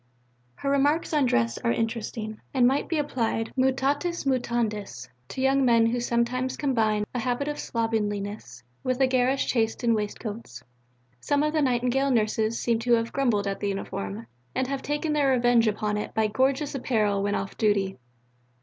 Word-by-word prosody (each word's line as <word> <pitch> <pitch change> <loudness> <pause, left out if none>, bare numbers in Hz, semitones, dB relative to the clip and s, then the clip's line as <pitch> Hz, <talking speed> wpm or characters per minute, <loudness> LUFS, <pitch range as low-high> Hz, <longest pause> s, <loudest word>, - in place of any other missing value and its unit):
Her 275 - -2
remarks 290 +4 +2
on 290 -4 +3
Dress 115 - +1
are 115 - 0
interesting, 225 - -3
and 250 -2 +5
might 270 +3 +2
be 330 - 0
applied, 235 -6 -1
mutatis 275 +6 0
mutandis, 225 - -1 0.2
to 260 - -5
young 270 +1 +3
men 230 -2 +5
who 235 +2 +1
sometimes 240 +2 -1
combine 220 -7 +1
a 250 - -1
habit 250 +4 -1
of 295 0 -3
slovenliness 205 - -3 0.2
with 255 0 -1
a 265 - +5
garish 260 +1 +1
taste 225 0 0
in 235 -1 +3
waistcoats. 210 - -5 0.6
Some 285 - +1
of 305 0 0
the 310 - +2
Nightingale 255 +1 +1
nurses 220 -1 +1
seem 230 -2 +1
to 240 +1 +2
have 230 0 +1
grumbled 235 -7 +1
at 195 0 -2
the 205 - -1
uniform, 110 - -4 0.3
and 260 - +1
to 260 - -6
have 275 -1 -2
taken 295 +1 -1
their 290 -2 +2
revenge 240 -2 +4
upon 210 0 0
it 210 - -5
by 220 - +2
gorgeous 265 +6 +1
apparel 215 -7 0
when 205 0 0
off 195 0 -4
duty. 200 - +1
235 Hz, 175 wpm, -26 LUFS, 215-265 Hz, 0.6 s, and